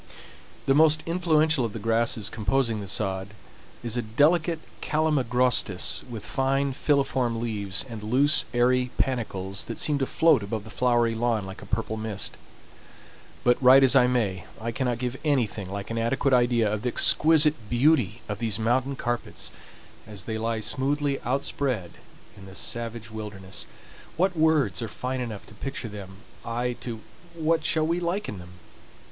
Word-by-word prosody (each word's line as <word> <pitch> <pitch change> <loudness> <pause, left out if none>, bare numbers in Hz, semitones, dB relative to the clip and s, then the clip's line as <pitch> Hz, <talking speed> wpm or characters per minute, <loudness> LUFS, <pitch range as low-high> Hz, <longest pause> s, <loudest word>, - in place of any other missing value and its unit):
The 135 - +3
most 155 +1 +4
influential 160 -4 +2
of 115 -3 -3
the - - -5
grasses 115 0 +1
composing 115 0 0
the 100 - -6
sod 95 +1 -2 0.5
is 120 -1 -2
a 120 - 0
delicate 155 +9 +2 0.2
calamagrostis 125 - +2
with 110 -4 -7
fine 135 +1 0
filiform 130 -5 0
leaves, 105 -3 -1
and 115 -3 -8
loose, 135 +7 +3
airy 125 +1 +2
panicles 100 -7 -2
that - - -6
seem 145 -2 +2
to 135 - 0
float 160 -7 +3
above 100 +1 -4
the 110 - -11
flowery 120 -1 +2
lawn 115 -2 0
like 95 0 -9
a 100 - -11
purple 110 +1 -2
mist. 110 -2 -3 1.1
But, 125 +1 +3
write 130 +1 +7
as 135 0 +5
I 125 -2 +6
may, 105 -9 -1
I 115 +2 -3
cannot 125 0 -1
give 125 +1 -3
anything 120 - 0
like 100 +2 -6
an 115 - -2
adequate 130 +4 +1
idea 120 -4 +3
of 105 - -2
the 125 - -1
exquisite 150 -4 +4
beauty 120 - +2
of 105 -1 -4
these 110 -4 0
mountain 125 +4 0
carpets 120 -2 -3 0.6
as 100 -4 -6
they 110 -1 -3
lie 115 0 -2
smoothly 140 +4 -1
outspread 125 -6 -2 0.4
in 95 -1 -13
the 95 - -11
savage 115 0 -2
wilderness. 100 -3 -6 0.5
What 185 +2 +1
words 155 - +2
are 115 - -3
fine 125 +4 -4
enough 110 -5 -6
to - - -14
picture 135 -4 -5
them 95 -2 -9 0.3
I 120 +2 -2
to 115 -3 -6 0.3
what 160 0 +1
shall 155 0 +1
we 170 +2 0
liken 175 - -3
them? 90 0 -12
120 Hz, 160 wpm, -26 LUFS, 110-135 Hz, 1.1 s, write